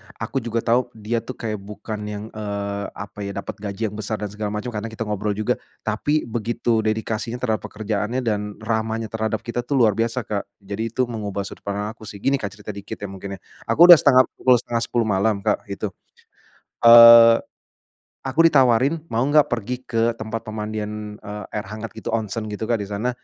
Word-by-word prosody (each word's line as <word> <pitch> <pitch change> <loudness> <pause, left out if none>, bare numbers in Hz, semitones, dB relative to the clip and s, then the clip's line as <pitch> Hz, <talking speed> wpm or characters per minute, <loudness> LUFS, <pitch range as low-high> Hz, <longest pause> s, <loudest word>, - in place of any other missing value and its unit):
aku 135 - -3
juga 115 -1 -2
tahu, 120 +2 +2
dia 110 +2 -2
tuh 130 +2 -8
kayak 110 -3 -4
bukan 105 +2 -7
yang, 105 0 -5
eee, 100 -1 -4
apa 100 0 -9
ya, 100 -1 -5
dapat 100 - -6
gaji 105 +1 -3
yang - - -9
besar 110 +1 -2
dan 105 -2 -5
segala 105 0 -4
macam, 105 +4 -4
karena 110 0 -4
kita 110 0 -5
ngobrol 105 -1 -2
juga. 110 0 -1 0.2
Tapi 150 +1 0
begitu 115 0 -1
dedikasinya 110 +1 -2
terhadap 115 -3 -2
pekerjaannya 110 +4 -2
dan 105 -2 -2
ramahnya 110 0 -2
terhadap 110 -1 -2
kita 120 +1 -3
tuh 125 +4 -2
luar 115 -5 +5
biasa, 115 +3 -1
Kak. 100 -1 -3 0.2
Jadi 105 +3 -3
itu 125 +3 0
mengubah 105 -5 -4
sudut 100 - -11
pandang 105 +1 -2
aku 110 -1 -13
sih, 105 - -8
gini 135 0 +2
Kak 100 -3 -5
cerita 105 0 -7
dikit 100 -1 -7
ya 100 -1 -7
mungkin 95 +1 -7
ya. - - -16 0.3
Aku 170 - +5
sudah 170 - +11
setengah 130 -2 +6 0.2
pukul 130 -1 +5
09:30 120 0 -1
malam, 100 -1 +1
Kak - - 0
itu. 100 0 -4 0.9
Eee, 115 0 +10 0.8
aku 135 +4 -1
ditawarin, 135 +1 +3
"Mau 115 +3 +1
enggak 145 +1 +4
pergi 125 +2 -3
ke 115 -1 0
tempat 110 0 -6
pemandian, 105 -1 -5
eee, 105 0 -7
air 105 -2 -4
hangat 110 +2 -7
gitu, 110 0 -5
onsen?" 110 0 -2
Gitu 105 0 -6
Kak, 115 - +2
di 100 - -4
sana. 105 +5 -2
110 Hz, 195 wpm, -22 LUFS, 105-115 Hz, 0.9 s, sudah